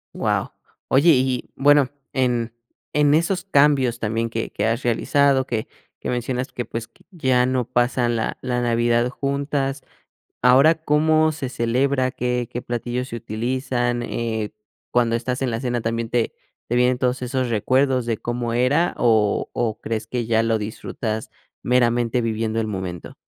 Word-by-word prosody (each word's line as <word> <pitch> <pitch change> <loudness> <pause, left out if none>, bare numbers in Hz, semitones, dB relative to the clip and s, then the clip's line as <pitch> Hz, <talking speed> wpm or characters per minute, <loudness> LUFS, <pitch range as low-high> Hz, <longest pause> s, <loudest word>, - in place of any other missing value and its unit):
Wao, - - -1 0.3
oye 140 +6 +4
y 130 -3 +5
y - - -8
bueno 145 -1 +5 0.2
en 120 -3 0 0.4
en 145 -1 +4
esos 175 +4 +1
cambios 140 -8 +3
también 115 +1 -1
que 115 0 -3
que 105 - -2
has 115 +3 0
realizado 135 +3 +2
que 115 -4 -3 0.3
que - - -5
mencionas 125 +1 -2
que 120 - -3
pues 115 0 -6
que - - -27
ya 130 -7 +2
no 130 -1 0
pasan 120 -1 +1
la 110 - -2
la 125 -1 -1
Navidad 120 0 +2
juntas, 140 0 -2 0.6
¿ahora 135 +6 +6
cómo 155 0 +2
se 135 -4 -4
celebra?, 130 +2 +1
¿qué 125 -1 -2
qué 120 - -5
platillos 120 +1 -3
se - - -5
utilizan?, 120 +2 -2
eh, 110 -3 -3 0.4
cuando 120 -1 +2
estás 125 +2 -2
en 125 - 0
la 115 - -2
cena, 120 -2 -1
¿también 115 0 -2
te 120 -2 0 0.3
te 120 - -1
vienen 125 0 +3
todos 125 0 0
esos 125 0 -1
recuerdos 130 +3 +1
de 115 - 0
cómo 120 0 -3
era 135 +8 +2
o 110 -3 +2
o 115 -3 -1
crees 110 -1 -4
que 120 -1 -2
ya 110 0 +2
lo 115 -1 +1
disfrutas 110 +1 -4 0.3
meramente 120 -1 +2
viviendo 115 0 -1
el 110 - 0
momento? 95 -4 -5
120 Hz, 160 wpm, -22 LUFS, 115-130 Hz, 0.6 s, ahora